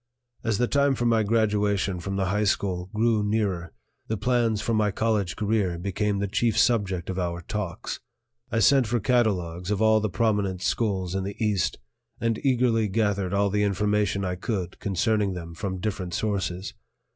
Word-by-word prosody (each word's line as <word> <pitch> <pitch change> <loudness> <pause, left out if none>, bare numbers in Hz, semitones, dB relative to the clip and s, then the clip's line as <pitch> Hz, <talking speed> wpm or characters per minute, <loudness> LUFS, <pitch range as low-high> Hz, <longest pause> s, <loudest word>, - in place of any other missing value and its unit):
As 110 -3 0
the 125 - +2
time 140 0 +2
for 120 - -2
my 115 -1 +3
graduation 105 -3 +1
from 95 +3 -4
the 95 -1 0
high 105 0 +1
school 95 -2 -1
grew 110 -1 +2
nearer, 100 -6 -1 0.4
the 110 - -1
plans 115 -1 +1
for 115 - -1
my 110 -1 +2
college 105 -3 0
career 105 -5 0
became 100 +3 -1
the 100 +1 -1
chief 115 +3 +1
subject 100 -8 +2
of 95 - -3
our 85 -1 -2
talks. 105 +1 -4 0.5
I 115 - +1
sent 135 +2 +5
for 120 +2 +1
catalogues 95 -8 0
of 105 -2 0
all 110 0 +5
the 110 0 -1
prominent 100 -2 0
schools 95 -6 0
in 95 0 -1
the 100 +1 -5
East 100 -8 0 0.4
and 115 -1 -1
eagerly 120 -5 +2
gathered 100 -2 0
all 100 0 +2
the 105 +1 +1
information 105 -1 +1
I 90 - -1
could 95 -2 -3
concerning 105 0 +1
them 85 -2 -7
from 95 +3 -4
different 90 -3 -3
sources. 100 0 -2
105 Hz, 175 wpm, -26 LUFS, 95-110 Hz, 0.5 s, sent